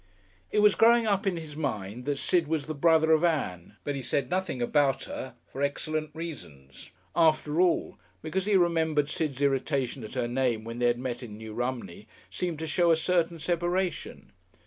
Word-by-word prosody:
It 210 - +3
was 210 -1 +7
growing 235 0 +5
up 200 -1 +1
in 180 -3 +1
his 155 -3 -8
mind 120 -6 -4
that 145 -1 -1
Sid 170 +2 +1
was 155 -2 -1
the 155 - -4
brother 160 +1 +4
of 160 +1 +4
Ann, 105 - -1
but 145 - -2
he 140 - -4
said 125 +1 -1
nothing 185 -7 -1
about 135 +2 +2
her 130 -2 -7
for 135 - -8
excellent 155 +2 -1
reasons. 75 - -9 0.3
After 155 -1 +3
all, 180 -2 +1 0.2
because 185 +5 -2
he 205 -2 +4
remembered 160 -4 +2
Sid's 145 -3 -2
irritation 135 -2 0
at 110 - -8
her 125 -2 0
name 120 -3 0
when 115 +1 -6
they 120 - +3
had 120 0 +2
met 125 0 -4
in 110 -4 -8
New 110 0 -8
Romney 120 -5 -4 0.2
seemed 170 - -3
to 160 - -4
show 170 +3 +2
a 165 - +6
certain 170 +1 +1
separation. 175 +2 -2
150 Hz, 190 wpm, -28 LUFS, 125-170 Hz, 0.3 s, was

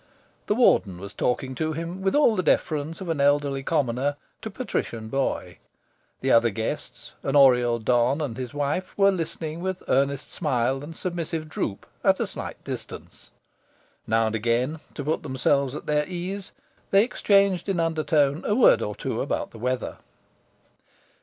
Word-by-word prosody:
The 210 - +2
Warden 105 - +3
was 100 +2 -8
talking 130 +1 -1
to 155 +3 -2
him, 170 +4 -5
with 195 +5 +1
all 290 -7 +5
the 185 - +1
deference 160 -1 0
of 165 -5 -2
elderly 140 -1 +2
commoner 135 -1 0 0.3
to 220 - -5
patrician 120 - -4
boy. 120 -9 -2 0.6
The 130 - +1
other 115 0 +5
guests 110 +1 -5
an 135 - -1
Oriel 125 -4 +5
don 120 +4 +2
and 140 -7 -3
his 125 -1 -5
wife 145 +5 -2
were 200 0 +5
listening 165 -2 -4
with 190 0 -3
earnest 140 +1 +1
smile 135 -4 0
and 160 +2 -8
submissive 165 -3 -3
droop, 105 -9 -4 0.2
at - - +4
a - - +1
slight - - -7
distance. - - -8 0.8
Now 115 +1 +3
and 110 - -1
again, 120 +7 0 0.2
to 145 - -4
put 155 +3 -1
themselves 140 0 0
at - - -7
their 150 0 +1
ease, 185 +2 -5 0.4
they 195 +1 +5
exchanged 200 -5 +2
in 190 -3 0
undertone 155 -2 +1
a 210 - +1
word 250 - +6
or 105 - -3
two - - -3
about - - -2
the 115 - -12
weather. 125 +1 -2
145 Hz, 160 wpm, -25 LUFS, 125-170 Hz, 0.8 s, word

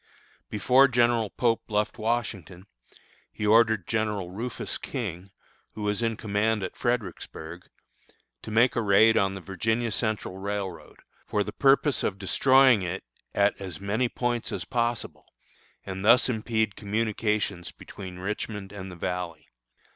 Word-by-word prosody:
Before 125 +6 +5
General 120 -3 +2
Pope 115 +1 0
left 105 +1 -1
Washington, 100 -6 -3 0.7
he 105 - -4
ordered 110 -2 +4
General 105 -5 -1
Rufus 115 +6 -4
King, 100 - -5 0.4
who 105 - -6
was 105 +2 0
in 115 -2 0
command 105 0 0
at 95 - -5
Fredericksburg, 95 -7 -4 0.7
to - - -9
make 115 +3 +3
a 120 - +1
raid 110 +2 +5
on 95 0 +2
the 95 - -7
Virginia 110 +6 -1
Central 105 -3 -2
Railroad, 100 -3 -5 0.3
for 105 - +1
the - - -7
purpose 140 -2 +3
of 95 - -1
destroying 130 +4 +5
it 90 +1 -4 0.3
at 100 0 +4
as 90 -4 -6
many 105 +5 0
points 120 -1 -2
as - - -4
possible, 120 -2 -2 0.6
and 95 0 -5
thus 120 +4 +6
impede 110 -3 0
communications 105 -3 -1
between 95 -2 -10
Richmond 100 +1 -4
and 95 -2 -7
the - - -9
Valley. 85 -2 -4
105 Hz, 140 wpm, -27 LUFS, 95-115 Hz, 0.7 s, thus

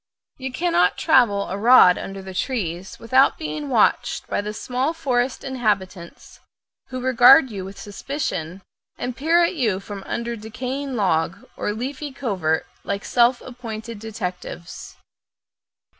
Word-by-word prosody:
You 265 -1 -5
cannot 260 - +2
travel 205 -6 +3
a 190 - -4
rod 225 -5 +7
under 195 0 -7
the 190 0 -8
trees 185 -6 -3
without 260 +4 +3
being 305 -2 -5
watched 230 -5 +2
by - - -2
the 210 +1 -4
small 255 +8 -2
forest 255 -5 -1
inhabitants, 205 -9 -3 0.5
who 255 0 -5
regard 260 +2 +6
you 195 -3 -5
with 195 +1 -9
suspicion, 195 - -5 0.3
and 250 -1 -4
peer 330 +6 +3
at 340 - +1
you 225 - 0
from 200 0 -8
under 235 0 -3
decaying 255 +5 -5
logs 180 -7 0
or - - -2
leafy 265 +6 -5
covert 185 - -1 0.2
like 200 0 -3
self 240 +1 +3
appointed 230 -3 -8
detectives. 185 -5 -7
235 Hz, 135 wpm, -22 LUFS, 195-260 Hz, 0.5 s, rod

